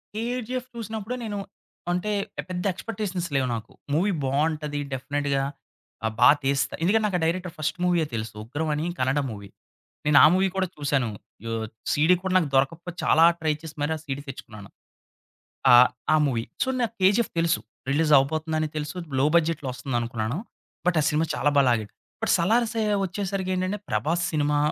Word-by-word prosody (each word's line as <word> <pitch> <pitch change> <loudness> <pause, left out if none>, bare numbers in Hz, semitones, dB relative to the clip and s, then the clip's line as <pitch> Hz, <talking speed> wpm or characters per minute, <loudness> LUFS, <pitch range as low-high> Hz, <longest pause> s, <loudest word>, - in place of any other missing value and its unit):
'KGF' 250 +2 -3
చూసినప్పుడే 220 +1 -4
నేను 205 -2 -4 0.5
అంటే 180 +4 -1 0.4
పెద్ద 180 -1 -3
ఎక్స్‌పెక్టేషన్స్ 190 -4 -4
లేవు 135 -1 +2
నాకు. 115 +1 -7 0.2
మూవీ 190 +6 +2
బావుంటది 150 +2 0
డెఫినిట్‌గా 140 +1 -1 0.6
ఆహ్, 110 - -1
బాగా 125 +4 +8
తీస్తా 140 0 +1
ఎందుకంటే 215 +5 +3
నాకు 190 -4 +1
ఆ - - -5
డైరెక్టర్ 175 +1 -1
ఫస్ట్ 155 +2 -2
మూవీయే 175 -3 +2
తెలుసు. 110 -1 -4
ఉగ్రం 145 +7 -3
అని 150 +2 -2
కనడం 135 +3 +1
మూవీ. 100 -2 -9 0.6
నేనా 145 -2 +7
మూవీ 190 +1 +3
కూడా 190 -1 +1
చూసాను. 140 -5 0 0.4
యొ 115 - -3 0.4
సీడీ 160 +5 +4
కూడా 190 - -1
నాకు 160 -6 +1
దొరకకపోతే 165 +6 0
చాలా 160 - +5 0.2
ట్రై 155 -1 +1
చేసి 160 -1 -9
మరి 155 +2 +1
ఆ - - -5
సీడీ 140 -2 -4
తెచ్చుకున్నాను. 105 -6 -10 1.0
ఆహ్, 125 +1 +9 0.3
ఆ - - +6
మూవీ. 120 -4 -1 0.2
సో - - -5
నాకు 235 -1 -1
'కేజీఎఫ్' 205 +5 +3
తెలుసు. 165 0 +2 0.3
రిలీజ్ 150 +2 +2
అవ్వబోతుందని 155 +2 0
తెలుసు. 150 +2 -4 0.2
లో 140 - +4
బడ్జెట్‌లో 155 -4 +1
ఒస్తుందనుకున్నాను 120 0 -2 0.5
బట్ 180 - +3
ఆ - - +1
సినిమా 155 +2 +1
చాలా 145 - +2
బాగా 140 - +5
లాగాడు. 110 -3 -1 0.3
బట్ - - +2
సలార్ 225 +8 +3
సె 225 - 0 0.2
ఒచ్చేసరికేంటంటే 190 0 -2
'ప్రభాస్' 170 +3 0
సినిమా 150 -1 +1
155 Hz, 160 wpm, -25 LUFS, 140-185 Hz, 1.0 s, ఆహ్